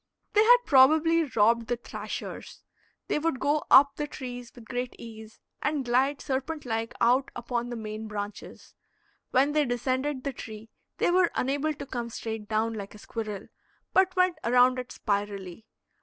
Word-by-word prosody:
They 425 - +6
had - - +8
probably 315 +4 +5
robbed 230 +2 +3
the 245 - 0
thrashers. 235 - -7 0.4
They - - 0
would 315 -4 -1
go 290 +2 +1
up 275 +1 +7
the 295 - -2
trees 245 -4 -7
with 240 -2 -13
great 245 +2 -4
ease, 220 -1 -11 0.2
and 290 -4 -1
glide 265 +4 +1
serpent 275 +3 -3
like 225 -1 -3
out 255 +3 +3
upon 240 0 -3
the 240 - -4
main 215 -1 -6
branches. 205 -1 -7 0.6
When 275 +3 +3
they 300 0 +3
descended 260 +2 -1
the 275 - -3
tree 220 -2 -9 0.3
they - - +2
were 360 -1 +4
unable 285 +4 0
to 280 - -7
come 240 -3 -4
straight 220 -2 -6
down, 220 +1 0
like 205 -1 -7
a - - -10
squirrel, 210 -2 -6 0.4
but 375 -1 +3
went 365 -3 +2
around 250 +2 +4
it 250 - -7
spirally. 200 -1 -3
245 Hz, 165 wpm, -27 LUFS, 225-285 Hz, 0.6 s, had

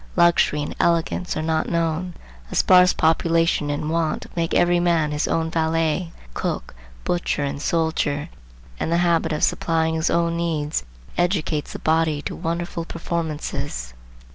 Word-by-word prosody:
Luxury 170 -4 +4
and - - -5
elegance 170 +1 +1
are 155 - -1
not 160 0 0
known. 170 +1 -1 0.4
A - - -4
sparse 180 0 +6
population 165 -1 +2
and 150 +2 -2
want 165 -1 0
make 165 -1 -1
every 175 0 +4
man 170 -3 +2
his 150 0 -1
own 160 0 0
valet, 165 +1 0 0.2
cook, - - -3 0.3
butcher 175 -4 -1
and 140 0 -3
soldier, 160 -2 0 0.5
and - - -1
the 170 - +3
habit 165 -1 +2
of 155 - -1
supplying 160 -1 +1
his 160 +1 0
own 170 0 +1
needs 155 - -1 0.4
educates 170 -4 0
the - - -4
body 160 -1 +1
to - - -4
wonderful 170 0 -3
performances. 160 - -4
165 Hz, 145 wpm, -23 LUFS, 155-170 Hz, 0.5 s, sparse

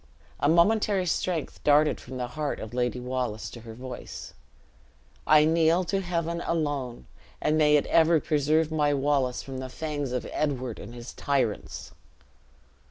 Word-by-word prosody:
A 145 - +2
momentary 195 +3 +3
strength 170 -1 -2
darted 150 +1 +4
from 130 +1 -8
the 125 -1 -3
heart 150 +2 -3
of 110 +1 -7
Lady 125 0 -1
Wallace 125 -3 -3
to 120 - -10
her 110 -1 -10
voice, 130 +2 -8 0.9
"I 155 0 +7
kneel 165 +2 +3
to 195 +2 -1
Heaven 170 -2 -2
alone, 145 - -2 0.3
and 150 - +1
may 150 -1 +5
it 145 - +3
ever 165 0 +4
preserve 155 +1 +1
my 150 -2 +2
Wallace 135 -3 0
from 135 -1 -6
the 130 0 -5
fangs 145 -1 -4
of 125 -1 -2
Edward 130 -6 -2
and 115 +4 -9
his 120 0 -8
tyrants!" 130 -7 -2
145 Hz, 155 wpm, -27 LUFS, 125-160 Hz, 0.9 s, I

